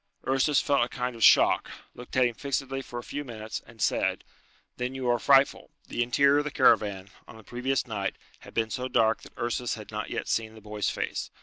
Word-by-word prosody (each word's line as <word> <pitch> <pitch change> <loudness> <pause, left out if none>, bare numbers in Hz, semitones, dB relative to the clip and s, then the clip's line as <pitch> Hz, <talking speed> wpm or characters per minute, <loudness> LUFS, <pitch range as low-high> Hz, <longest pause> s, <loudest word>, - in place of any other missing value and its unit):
Ursus 135 +2 +3
felt 140 -3 +2
a 120 - -3
kind 125 0 -3
of 115 - -3
shock, - - +5 0.2
looked 125 +1 -8
at 130 - +5
him 120 - 0
fixedly 135 +1 -3
for 120 - -8
a 120 - -5
few 145 +4 -5
minutes, 110 -4 -6
and 115 -2 -16
said, - - 0 0.5
"Then 125 +1 -3
you 130 -1 -3
are 120 - +1
frightful." 135 +2 +4 0.2
The - - -2
interior 140 +4 +4
of - - 0
the 150 - -3
caravan, 100 -8 +2 0.2
on - - -12
the 110 - -14
previous 125 +4 -1
night, 105 -5 -3 0.2
had - - -15
been 110 -1 0
so 130 -1 -2
dark 115 -3 +2
that - - -14
Ursus 120 0 -2
had 110 -1 -10
not 105 -1 -4
yet - - -4
seen 110 -1 -1
the - - -11
boy's 105 0 -2
face. - - -3
120 Hz, 220 wpm, -27 LUFS, 110-135 Hz, 0.5 s, shock